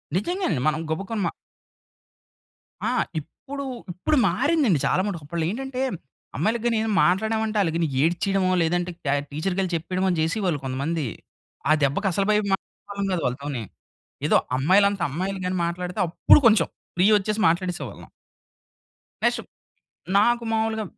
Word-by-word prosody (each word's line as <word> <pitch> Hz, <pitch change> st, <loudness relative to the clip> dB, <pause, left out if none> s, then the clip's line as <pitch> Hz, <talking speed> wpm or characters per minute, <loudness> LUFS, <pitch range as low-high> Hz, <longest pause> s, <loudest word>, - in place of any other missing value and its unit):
నిజంగానే 210 Hz, -, 0 dB
మనం 155 Hz, +1 st, +1 dB
గబుక్కున 195 Hz, +7 st, -3 dB
మా -, -, 0 dB, 1.5 s
ఆ! -, -, +2 dB, 0.3 s
ఇప్పుడు, 280 Hz, -, -8 dB, 0.3 s
ఇప్పుడు 185 Hz, -, 0 dB
మారిందండి 260 Hz, -, +2 dB
చాలా -, -, +2 dB
మట్టుకు. 180 Hz, -7 st, -4 dB
అప్పట్లో 165 Hz, +2 st, -2 dB
ఏంటంటే, 265 Hz, +3 st, -4 dB, 0.6 s
అమ్మాయిలకి 220 Hz, +8 st, 0 dB
గాని 235 Hz, -1 st, +2 dB
ఏదైనా 220 Hz, 0 st, -1 dB
మాట్లాడమంటే 220 Hz, +4 st, +1 dB
ఆళ్ళ 180 Hz, -, +2 dB
గాని 165 Hz, -1 st, +1 dB, 0.2 s
ఏడ్చేయడమో 185 Hz, +3 st, +1 dB
లేదంటే, 175 Hz, +2 st, 0 dB
క -, -, -3 dB, 0.2 s
టీచర్‌కెళ్ళి 185 Hz, +4 st, -1 dB
చెప్పేయడమో 185 Hz, +3 st, -1 dB
చేసేవాళ్ళు 170 Hz, -1 st, 0 dB
కొంతమంది. 140 Hz, +4 st, -2 dB, 0.6 s
ఆ -, -, +6 dB
దెబ్బకి 145 Hz, +9 st, +1 dB
అసలు 195 Hz, +3 st, 0 dB
భయం 210 Hz, 0 st, +2 dB
మాటలాడే 195 Hz, -, -6 dB
వాళ్ళం 200 Hz, 0 st, -2 dB
కాదు 170 Hz, -, -1 dB
వాళ్ళతోని. 130 Hz, 0 st, -3 dB, 0.6 s
ఏదో -, -, +5 dB, 0.2 s
అమ్మాయిలంతా 195 Hz, +6 st, +3 dB
అమ్మాయిలు 185 Hz, +6 st, -3 dB
గాని 185 Hz, 0 st, -1 dB
మాట్లాడితే, 180 Hz, +3 st, -4 dB
అప్పుడు 175 Hz, -, +6 dB
కొంచెం 215 Hz, -7 st, +4 dB, 0.3 s
ఫ్రీ 180 Hz, +3 st, +5 dB
వచ్చేసి 210 Hz, +2 st, -2 dB
మాట్లాడేసేవాళ్ళం. 175 Hz, -5 st, -3 dB, 1.1 s
నెక్స్ట్ -, -, +2 dB, 0.8 s
నాకు 235 Hz, +2 st, +3 dB
మామూలుగా 220 Hz, 0 st, 0 dB
185 Hz, 130 wpm, -24 LUFS, 165-215 Hz, 1.5 s, ఆ